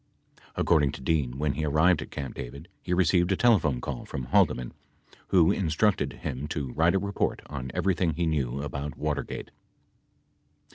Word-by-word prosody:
According 75 -4 +3
to - - -8
Dean, 65 -4 0
when 75 0 0
he 80 - -3
arrived 80 +3 +3
at - - -7
Camp 70 -1 -5
David, 70 +7 -8
he 90 - -6
received 90 0 +3
a - - +3
telephone 90 - +3
call 65 0 -5
from 65 - -5
Haldeman 60 0 +2 0.5
who 85 -4 +5
instructed 80 -3 +1
him 65 +3 -5
to 70 -5 -4
write 85 +3 +3
a - - +3
report 100 0 -2
on 65 -3 -6
everything 85 -4 +1
he 85 +1 0
knew 70 -4 -1
about 70 +1 -5
Watergate. 75 -1 -3
75 Hz, 160 wpm, -27 LUFS, 70-90 Hz, 0.5 s, who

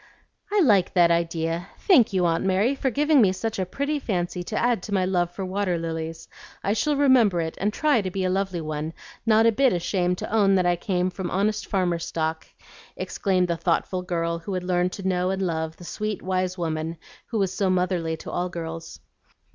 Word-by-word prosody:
"I 415 -1 +3
like 205 - +3
that 170 -2 +5
idea! 170 +1 -1
Thank 260 - +4
you, 185 -2 +1
Aunt 165 -1 +1
Mary, 190 +7 +2
for 270 -1 -1
giving 295 +2 +3
me 195 -4 +5
such 210 +3 -3
a 185 - -1
pretty 285 +8 -2
fancy 180 -7 -2
to - - -3
add 240 -4 +2
to 205 - -8
my 185 -1 +2
love 175 -2 +1
for 190 +2 -5
water 185 -1 -1
lilies. 165 0 -5 0.4
I 200 - +1
shall 295 +6 +1
remember 255 -10 +4
it, 160 -1 -3
and 205 +2 +1
try 290 -1 +2
to 190 - -3
be 190 +1 -3
a 185 - +1
lovely 190 -2 -1
one, 155 +1 -4 0.3
not 220 0 +5
a 230 - +6
bit 260 +2 +3
ashamed 180 0 0
to - - -6
own 200 -3 +4
that 185 -1 +2
I 175 0 +3
came 180 +1 -1
from 185 -1 -4
honest 205 +4 0
farmer 180 -4 0
stock," 160 -1 -3 0.5
exclaimed 185 -3 0
the 170 -1 -1
thoughtful 180 +2 0
girl 170 -2 -2
who 185 +3 -5
had 180 - -2
learned 180 0 +1
to 195 -2 -4
know 180 -1 +1
and 190 0 -1
love 160 -2 -2
the 175 - -11
sweet, 215 +3 -4
wise 185 0 -1
woman 160 -1 -3 0.3
who 230 - -3
was 195 -3 0
so 190 0 0
motherly 180 -3 0
to - - -8
all 180 +1 -1
girls. 165 -1 -7
185 Hz, 210 wpm, -25 LUFS, 170-205 Hz, 0.5 s, a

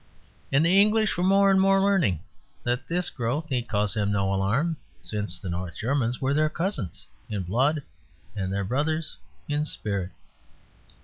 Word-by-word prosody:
And 140 +4 +4
the 190 +4 +6
English 215 +1 +3
were 175 - -1
more 195 +1 +5
and 190 0 +5
more 195 0 +5
learning 190 - +2 0.4
that 120 +2 -1
this 175 +1 0
growth 140 +6 -2
need 120 -2 -1
cause 105 -2 0
them 105 -2 0
no 100 -1 +1
alarm, 120 - +1 0.3
since 95 0 -3
the 95 - -8
North 90 -1 -4
Germans 125 -1 0
were 135 +1 +1
their 155 +1 +2
cousins 155 - -3 0.2
in 100 -3 -2
blood 135 - +2 0.5
and 95 -2 -2
their 100 0 -1
brothers 155 +8 0 0.3
in 145 0 0
spirit. 100 -10 -3
130 Hz, 165 wpm, -26 LUFS, 100-165 Hz, 0.5 s, the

